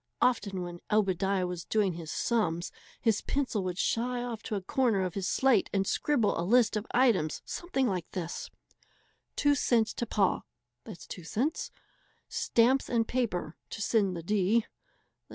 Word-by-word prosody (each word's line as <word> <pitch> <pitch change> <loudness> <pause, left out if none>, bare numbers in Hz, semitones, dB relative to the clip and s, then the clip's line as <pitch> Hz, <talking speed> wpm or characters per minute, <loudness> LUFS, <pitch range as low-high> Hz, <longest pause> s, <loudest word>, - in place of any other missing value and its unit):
Often 205 -7 +1
when 175 -1 -7
Obadiah 195 -2 +2
was 180 -2 -4
doing 205 -4 +1
his 165 -1 -7
"sums" 175 -7 0 0.3
his 225 -3 +2
pencil 260 -8 -1
would 180 -1 -3
shy 245 +4 0
off 235 -3 -5
to 210 - -4
a 200 - -2
corner 225 -3 +1
of 180 -2 -2
his 195 -2 -2
slate 260 -4 +3
and 195 -1 +1
scribble 240 - +1
a - - +1
list 225 +5 +3
of 210 +2 -2
items 225 -12 +2
something 310 -7 -1
like 185 -8 -2
this: 170 -2 -4 0.9
2 290 0 +3
cents 235 -5 +2
to 235 - -3
Pa 200 -4 +2 0.5
$.02 230 - -3 0.6
Stamps 250 +4 +2
and 230 -2 +1
paper 180 -11 -1
(to - - -6
send 200 -4 +1
the 165 - -6
D) 210 +4 +2
210 Hz, 155 wpm, -30 LUFS, 185-240 Hz, 0.9 s, slate